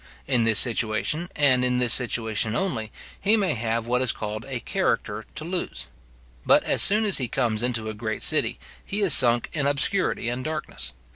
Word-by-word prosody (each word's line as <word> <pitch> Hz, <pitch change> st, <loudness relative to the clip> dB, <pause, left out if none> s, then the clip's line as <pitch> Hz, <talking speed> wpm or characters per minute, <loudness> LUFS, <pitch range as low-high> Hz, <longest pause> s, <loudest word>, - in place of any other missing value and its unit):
In 125 Hz, -4 st, 0 dB
this 110 Hz, -2 st, +3 dB
situation, 120 Hz, -, +1 dB
and 130 Hz, -4 st, +3 dB
in 125 Hz, 0 st, 0 dB
this 125 Hz, -2 st, +4 dB
situation 110 Hz, -3 st, +1 dB
only, 120 Hz, -, -3 dB, 0.3 s
he 215 Hz, +3 st, +3 dB
may 190 Hz, -7 st, 0 dB
have 115 Hz, 0 st, -3 dB
what 125 Hz, +1 st, 0 dB
is 130 Hz, -, +4 dB
called 110 Hz, +2 st, -6 dB
a 130 Hz, -3 st, -5 dB
character 115 Hz, -, -3 dB
to 155 Hz, -, -4 dB
lose. 175 Hz, -, -5 dB, 0.6 s
But -, -, +3 dB
as -, -, 0 dB
soon 215 Hz, +2 st, +4 dB
as 205 Hz, -, +4 dB
he 130 Hz, -, -2 dB
comes 110 Hz, -1 st, -1 dB
into 120 Hz, -3 st, -2 dB
a 110 Hz, -, -5 dB
great 110 Hz, +1 st, -5 dB
city, -, -, +2 dB, 0.3 s
he 205 Hz, +2 st, -4 dB
is 190 Hz, -7 st, +5 dB
sunk 120 Hz, -2 st, +4 dB
in 145 Hz, -4 st, -1 dB
obscurity 145 Hz, 0 st, 0 dB
and 125 Hz, +1 st, -4 dB
darkness. 155 Hz, -, -5 dB
125 Hz, 190 wpm, -23 LUFS, 115-155 Hz, 0.6 s, is